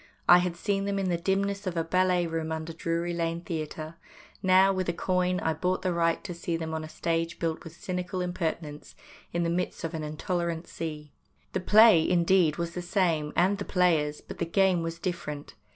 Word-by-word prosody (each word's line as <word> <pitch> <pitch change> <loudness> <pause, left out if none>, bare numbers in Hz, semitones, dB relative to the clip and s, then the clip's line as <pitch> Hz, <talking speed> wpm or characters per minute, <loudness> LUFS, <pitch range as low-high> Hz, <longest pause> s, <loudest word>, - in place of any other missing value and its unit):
I 175 - +9
had 180 -1 -1
seen 195 +1 -1
them 200 0 -1
in 195 -1 0
the 175 - +2
dimness 195 +3 -1
of 175 -2 -2
a 165 - +1
ballet 180 +1 +2
room 165 -1 -3
under 160 +1 -4
Drury 170 +2 -2
Lane 170 0 -2
Theatre; 160 -1 -5 0.4
now, 190 +1 +5
with 185 -2 -1
a - - +1
coin, 180 +1 0
I 160 - +1
bought 180 +4 -1
the 185 -2 +1
right 165 -1 +1
to 180 - -5
see 170 0 -3
them 160 -1 -4
on 160 0 -3
a 155 - -8
stage 165 +1 -2
built 165 -1 -2
with 165 -1 -10
cynical 180 +1 -4
impertinence 165 -4 -4 0.4
in 170 0 0
the 170 - 0
midst 180 +1 -2
of 165 - -2
the 160 - -4
intolerant 170 +2 -2
sea. 150 -3 -6 0.4
The - - 0
play, 210 -3 +6
indeed, 175 -2 +3
was 170 0 -2
the 180 - -5
same, 170 -4 0
and 190 +3 +3
the - - -2
players, 160 -5 +1
but - - -10
the 170 - 0
game 185 0 +2
was 165 0 -4
different. 170 -4 -5
170 Hz, 205 wpm, -28 LUFS, 165-185 Hz, 0.4 s, I